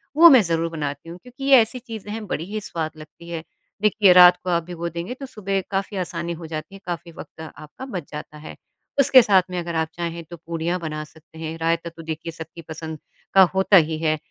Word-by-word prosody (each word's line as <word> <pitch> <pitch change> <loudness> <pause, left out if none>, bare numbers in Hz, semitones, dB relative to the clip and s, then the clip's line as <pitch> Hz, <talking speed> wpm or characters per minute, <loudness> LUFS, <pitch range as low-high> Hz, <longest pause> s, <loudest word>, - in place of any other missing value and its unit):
वो 335 +2 +10
मैं 260 -5 +8
ज़रूर 165 -3 -1
बनाती 145 -1 -5
हूँ, 170 - -8
क्योंकि 250 +2 -11
ये 270 -3 +7
ऐसी 240 +3 -3
चीज़ें 220 -2 -7
बड़ी 165 - -3
ही 215 - -2
स्वाद 160 -5 -4
लगती 155 +2 -13
है, 165 -2 -5 0.4
देखिए, 210 -3 +5
रात 180 0 +8
को 185 - -3
आप 170 -1 +1
भिगो 170 0 -5
देंगे 170 +7 -5
तो 275 +2 -8
सुबह 195 -6 -3
काफ़ी 195 +1 -2
आसानी 170 -2 -3
हो 165 - -8
जाती 155 +3 -6
हैं, 195 - -13
काफ़ी 170 -1 -5
वक़्त 160 - -11
आपका 155 - -10
बच 180 - -6
जाता 150 0 -8
है। 150 - -10 0.4
उसके 260 -1 +7
साथ 200 -5 +4
में 180 - -4
अगर 170 -1 -4
आप 160 - -1
चाहें 170 -1 -5
तो 170 +2 -11
पूरियाँ 170 +2 -3
बना 155 -2 -4
सकते 160 +1 -18
हैं, 160 0 -5
रायता 165 +1 -1
तो 165 0 -12
देखिए 160 +1 -5
सबकी 165 +1 -10
पसंद 160 -1 -7 0.3
का 195 - +7
होता 190 +1 +5
ही 160 -2 +2
है 155 -1 +1
170 Hz, 220 wpm, -23 LUFS, 160-195 Hz, 0.4 s, वो